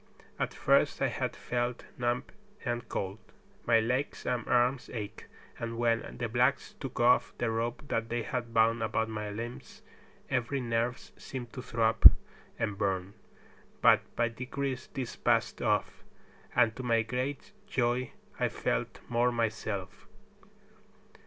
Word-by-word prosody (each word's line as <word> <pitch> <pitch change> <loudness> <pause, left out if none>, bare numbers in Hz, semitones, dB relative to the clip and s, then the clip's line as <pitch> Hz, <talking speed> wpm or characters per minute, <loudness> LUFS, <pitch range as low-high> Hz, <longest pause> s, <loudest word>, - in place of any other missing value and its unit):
At - - 0
first - - +3
I - - +2
had - - -2
felt 120 0 -2
numbed 120 0 -1 0.3
and 120 -2 -2
cold. 95 +2 -3 0.5
My 115 -1 +6
legs 125 +5 -1
and 125 -2 -1
arms 125 +2 +2
ached, 105 -4 -6 0.3
and 115 0 -4
when 115 -1 0
the 120 - -1
blacks 125 +4 +1
took 135 - -6
off 120 +1 +4
the 115 -2 0
rope 115 +4 -2
that 115 0 -1
they 120 0 -1
had 120 -1 -3
bound 115 0 +3
about 110 0 0
my 105 -1 -4
limbs 115 +4 -7 0.4
every 135 +2 0
nerve 120 0 0 0.2
seemed 125 -3 -7
to 130 - -5
throb 115 -2 +7 0.5
and 105 -3 -2
burn; 95 -1 -1 0.7
but - - +6
by 120 - +2
degrees 130 +3 -4
this 130 -3 -3
passed - - +1
off, - - 0 0.5
and 120 -3 +4
to - - -4
my 115 -2 +2
great 125 - -3 0.2
joy 125 - 0 0.3
I - - +2
felt - - -2
more 120 +1 +2
myself. 110 -4 -3
120 Hz, 140 wpm, -31 LUFS, 115-125 Hz, 0.7 s, throb